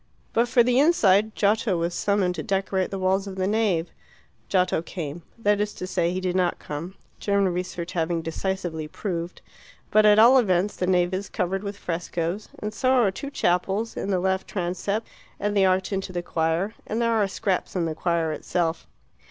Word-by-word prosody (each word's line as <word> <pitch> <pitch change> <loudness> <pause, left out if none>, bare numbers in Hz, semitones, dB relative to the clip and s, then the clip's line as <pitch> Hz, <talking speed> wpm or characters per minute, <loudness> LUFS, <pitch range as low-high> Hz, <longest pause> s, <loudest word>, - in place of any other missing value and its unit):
But 235 +1 +3
for 240 0 +4
the 250 +1 +3
inside 220 - +4
Giotto 205 -2 +2
was 170 +1 -1
summoned 200 -2 +1
to - - -4
decorate 190 -1 -1
the 195 - -4
walls 190 +1 +1
of 195 - -6
the 185 -1 -1
nave. 200 -5 +1 0.6
Giotto 180 -3 +2
came 165 -2 -6 0.2
that 205 -2 +2
is 210 0 -2
to - - -5
say, 175 -2 0
he 185 - -2
did 185 -1 -2
not 180 -2 +1
come, 165 +6 -6 0.2
German 200 -3 +1
research 175 -1 -4
having 165 -1 -1
decisively 165 -2 -3
proved 170 0 -5 0.5
but 215 - +5
at 210 0 +6
all 240 +4 +8
events 195 -3 +1
the 180 - -2
nave 180 0 +2
is 195 +2 -3
covered 190 +2 -1
with 200 0 -5
frescoes, 175 +2 -3
and 210 0 -5
so 255 +4 +1
are 240 -7 +4
two 275 +8 -6
chapels 195 -1 0
in - - -3
the 190 -2 +2
left 190 +1 0
transept, 200 +4 -2 0.3
and 205 0 -1
the 195 -1 +5
arch 185 +1 +1
into 190 -1 -3
the 175 -1 -3
choir, 165 +5 0
and 220 - -2
there 230 -1 +2
are 215 -3 +2
scraps 190 -1 -2
in 175 -2 +1
the 160 - -2
choir 165 -1 0
itself. 165 +1 -2
190 Hz, 195 wpm, -25 LUFS, 175-205 Hz, 0.6 s, all